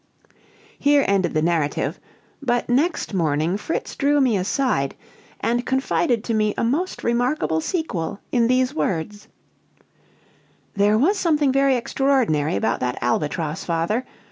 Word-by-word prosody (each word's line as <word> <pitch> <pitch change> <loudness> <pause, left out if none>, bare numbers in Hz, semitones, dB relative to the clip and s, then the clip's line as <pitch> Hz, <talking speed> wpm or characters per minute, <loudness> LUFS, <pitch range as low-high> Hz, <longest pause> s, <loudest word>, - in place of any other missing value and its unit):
Here 285 -1 +4
ended 195 -4 +1
the 155 - +2
narrative; 165 -3 0 0.4
but 245 -3 0
next 275 0 0
morning 160 -1 +1
Fritz 210 +10 -4
drew 290 +1 +2
me 255 -5 +3
aside, 190 - 0 0.5
and 240 +1 0
confided 260 -2 0
to 230 - -2
me 215 -1 +1
a - - 0
most 300 +11 -1
remarkable 240 - 0
sequel, 200 - -3
in 235 -2 +3
these 255 +2 +2
words: 205 - -3 1.5
"There 205 +1 +3
was 375 - +2
something 300 -6 +2
very 275 0 +3
extraordinary 240 - +1
about 110 +3 0
that 125 -1 -2
albatross, 150 +5 -1
father. 170 +8 -1
230 Hz, 130 wpm, -22 LUFS, 170-270 Hz, 1.5 s, Here